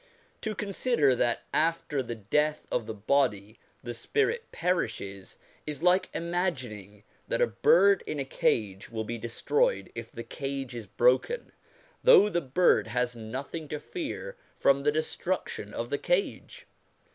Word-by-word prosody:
To 220 -1 -3
consider 200 - +2
that 120 -1 +1
after 160 -3 +1
the 120 -2 -5
death 150 +9 0
of 120 -3 -1
the 110 - -3
body 105 -2 0 0.2
the 120 -1 -4
spirit 445 - -1
perishes, 100 - -2 0.3
is 150 +1 -3
like 185 +1 +4
imagining 130 - -3 0.2
that - - +1
a - - +5
bird 200 - +4
in 150 - -3
a 135 - -1
cage 105 -6 0
will 110 -1 -3
be 115 +2 -5
destroyed 450 - 0
if - - -7
the - - -7
cage 135 -3 -5
is 115 -3 -7
broken, 125 - +2 0.5
though 485 - +8
the 175 -4 0
bird 145 -1 +3
has 125 +2 -1
nothing 130 +8 -6
to 150 0 -4
fear 365 - -5 0.2
from 140 0 +4
the 150 +1 +3
destruction 155 - -3
of 115 +2 -4
the 145 - 0
cage. 180 +2 -1
140 Hz, 145 wpm, -28 LUFS, 115-180 Hz, 0.5 s, though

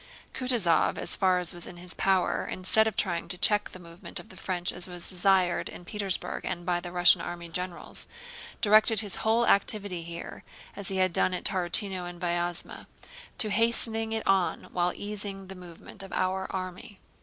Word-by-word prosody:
Kutúzov 240 -10 +1
as - - -3
far 185 -2 +2
as 180 0 -3
was 175 -1 -5
in 175 - -10
his 175 -1 -7
power, 190 -2 0
instead 220 +4 +8
of 220 - -4
trying 170 -2 0
to 180 +1 -5
check 210 +2 +1
the - - -11
movement 170 0 -8
of - - -14
the - - -13
French 180 -1 -3
as 175 +1 +1
was 175 -1 -4
desired 185 -1 +2
in 175 - -11
Petersburg 200 -2 -4
and 175 0 -5
by 175 -1 0
the 175 0 -8
Russian 175 0 +6
army 170 -1 -7
generals, 180 +1 -4 0.5
directed 215 0 +4
his 205 -3 -5
whole 225 +2 +1
activity 200 -3 +1
here, 170 0 -8 0.3
as 200 - -5
he 190 - -1
had 185 -1 +1
done 185 - +1
at - - -6
Tarútino 185 0 0
and 175 -1 -11
Vyázma, 175 0 -4 0.5
to 215 - +3
hastening 225 0 +2
it 225 0 -3
on 195 -2 +1
while 175 0 +1
easing 200 -1 -5
the 190 - -8
movement 180 +2 -11
of 195 - -10
our 190 +1 -1
army. 185 +2 -7
185 Hz, 185 wpm, -27 LUFS, 175-205 Hz, 0.5 s, instead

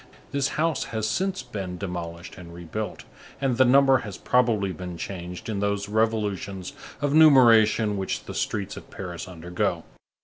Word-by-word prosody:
This 140 -1 +1
house 160 -1 +1
has 110 -1 -2
since 185 - -1
been 95 -7 -6
demolished 85 -2 -6
and 85 -2 -11
rebuilt, 85 +5 -6 0.4
and 130 -3 0
the 130 - +6
number 135 +1 +5
has 105 -5 -7
probably 115 -6 +2
been 90 0 -7
changed 90 -1 -6
in 105 -3 -2
those 100 0 -1
revolutions 105 -4 -1 0.3
of 145 -1 0
numeration 115 -8 +6
which 95 -1 -3
the - - -8
streets 100 -2 -2
of - - -11
Paris 90 -2 -7
undergo. 90 0 -2
105 Hz, 150 wpm, -25 LUFS, 90-125 Hz, 0.4 s, the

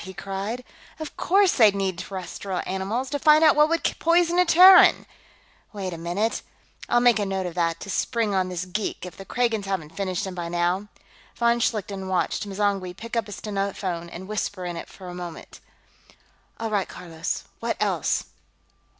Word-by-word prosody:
he 190 0 -9
cried. 200 +5 -4 0.4
"Of 310 -1 -7
course 390 0 +3
they'd 215 -4 +5
need 190 -3 -1
terrestrial 190 0 -5
animals, 210 +8 -2
to 285 - -1
find 305 +2 +6
out 310 -2 +6
what 300 +1 +5
would 335 0 0 0.2
poison 345 +1 +3
a 360 - +5
Terran! 365 +2 +8 0.7
Wait 190 -3 -4
a - - -6
minute; 180 +7 -1 0.5
I'll 240 - +4
make 240 -2 +5
a - - +1
note 190 -1 -2
of 175 - -4
that, 165 -1 0
to 200 - -7
spring 230 -2 0
on 185 -1 +1
this 180 0 -4
geek, 190 +1 -4
if 180 - -9
the 195 - -10
Kragans 230 -2 0
haven't 165 -5 -4
finished 185 -2 -2
him 190 - -5
by 175 -2 -5
now." 175 +4 0 0.5
Von 235 0 +2
Schlichten 200 -4 -2
watched 190 +2 -1
M'zangwe 195 -2 -1
pick 230 +2 -7
up 230 -2 0
a - - -9
stenophone 195 -4 -3
and 185 +2 -8
whisper 205 -3 -3
into 175 -1 -4
it - - -15
for 185 - -12
a 180 - -7
moment. 175 -2 -8 1.0
"All 225 -1 -3
right, 200 -3 0
Carlos, 165 -2 -5 0.2
what - - -2
else?" - - 0
195 Hz, 185 wpm, -24 LUFS, 180-230 Hz, 1.0 s, Terran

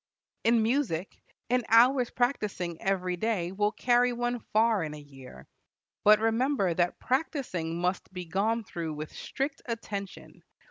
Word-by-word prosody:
In 230 -1 +4
music, 220 - -1 0.4
an 250 0 +3
hour's 245 +2 +5
practising 205 - -2
every 185 -2 0
day 185 -4 -1
will 205 +2 +1
carry 245 +1 +3
one 240 0 -1
far 220 -1 +3
in 150 -1 -5
a - - -9
year. 135 - -13 0.6
But 210 +1 +7
remember 225 -3 +1
that 175 +1 0
practising 250 - -2
must 180 +2 -2
be 180 -1 -6
gone 210 +7 0
through 165 -5 -5
with 155 +1 -7
strict 275 +1 -4
attention. 205 -4 -6
210 Hz, 140 wpm, -29 LUFS, 175-240 Hz, 0.6 s, But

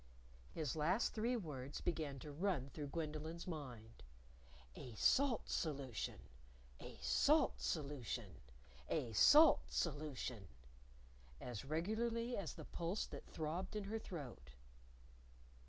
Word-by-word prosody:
His 155 -5 -2
last 175 +9 +2
three 235 +3 +1
words 145 - -5
began 150 -5 -1
to 150 - -7
run 150 -4 0
through 150 -2 -4
Gwendolyn's 155 +2 -4
mind 125 -9 -7 0.7
"A 120 -3 -8
salt 265 - +3
solution! 140 -7 -2 0.6
A - - -9
salt 65 +1 +4
solution! 120 - -2 0.6
A 125 -8 0
salt 300 - +8
solution!" 140 - -2 0.9
as 120 -2 -5
regularly 225 - 0
as 185 -6 -3
the - - -8
pulse 175 +5 -2
that - - -9
throbbed 170 +6 -3
in 210 - -1
her 215 +3 -2
throat. 145 - -7
155 Hz, 110 wpm, -40 LUFS, 130-185 Hz, 0.9 s, salt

